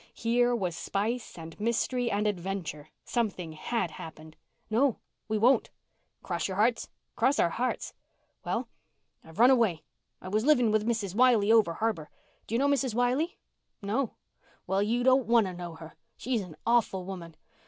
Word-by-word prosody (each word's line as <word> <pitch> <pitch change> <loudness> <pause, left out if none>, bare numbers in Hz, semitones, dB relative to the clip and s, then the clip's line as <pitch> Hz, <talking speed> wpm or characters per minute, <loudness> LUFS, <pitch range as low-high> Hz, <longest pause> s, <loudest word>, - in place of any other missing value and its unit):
Here 240 +1 +2
was 185 -7 -2
spice 220 +7 -3
and 165 +1 -10
mystery 235 +2 0
and 210 0 0
adventure. 180 -6 -3 0.2
Something 200 -8 -2
had 175 +3 -2
happened. 160 0 -10 0.3
"No, 240 +3 +2 0.3
we 215 0 0
won't." 245 +5 +3 0.5
"Cross 175 -2 -2
your 190 -1 -5
hearts?" 230 +3 +2 0.3
"Cross 260 +5 +2
our 170 - +3
hearts." 250 +7 -2 0.5
"Well, - - -2 0.6
I've 160 0 -15
run 245 +3 +7
away. 220 - +2 0.4
I - - -10
was 215 +3 0
living 250 -6 +4
with 215 0 +1
Mrs. 220 -6 -1
Wiley 225 -2 +4
over 220 -7 +5
harbour. 195 -9 -2 0.4
Do 225 - -2
you - - +4
know 275 +3 +2
Mrs. 270 -5 +1
Wiley?" 255 +8 +1 0.4
"No." 220 +5 -2 0.5
"Well, 195 +1 +1
you 235 +4 +1
don't 260 -2 +4
want 230 -2 +5
to 185 - -4
know 175 -2 -7
her. 160 0 -11 0.2
She's 245 -3 -1
an 180 -5 -9
awful 225 -6 +2
woman. 175 -4 -8
215 Hz, 165 wpm, -29 LUFS, 180-245 Hz, 0.6 s, run